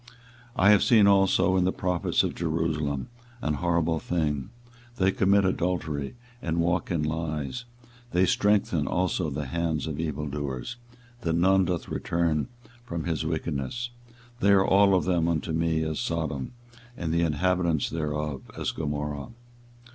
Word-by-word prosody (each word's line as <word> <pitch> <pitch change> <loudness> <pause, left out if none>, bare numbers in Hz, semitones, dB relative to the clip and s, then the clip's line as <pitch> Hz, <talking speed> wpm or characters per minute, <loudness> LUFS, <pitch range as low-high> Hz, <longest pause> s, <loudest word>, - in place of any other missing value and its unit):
24:023:014 120 - -19 0.5
I 100 - +5
have 105 - +6
seen 110 -4 +6
also 95 -1 +4
in 90 - +3
the 90 - +2
prophets 90 -2 0
of - - -1
Jerusalem 80 - -1 0.3
an 75 -8 -1
horrible 85 0 +1
thing: 75 -5 -1 0.5
they 95 -4 +2
commit 100 +1 +3
adultery, 85 - -1 0.3
and 80 0 -2
walk 85 +1 +1
in 85 -4 0
lies: 80 - -3 0.4
they 90 -4 +3
strengthen 95 -6 +2
also 90 -2 0
the 75 +1 -4
hands 80 0 -1
of 80 -2 -4
evildoers, 75 - -3 0.4
that 85 -8 -1
none 95 +3 +4
doth 90 -2 -2
return 85 -1 0 0.4
from 85 -8 -4
his 80 -1 -1
wickedness; 80 - -3 0.5
they 100 - +3
are 95 -1 +5
all 100 0 +5
of 90 - +1
them 85 -3 +2
unto 80 0 -1
me 80 0 +1
as 80 -1 -2
Sodom, 80 - -2 0.4
and 80 -2 -2
the 85 - +2
inhabitants 85 0 +1
thereof 75 -3 -3
as - - -1
Gomorrah. 75 -2 -3
85 Hz, 145 wpm, -27 LUFS, 75-90 Hz, 0.5 s, have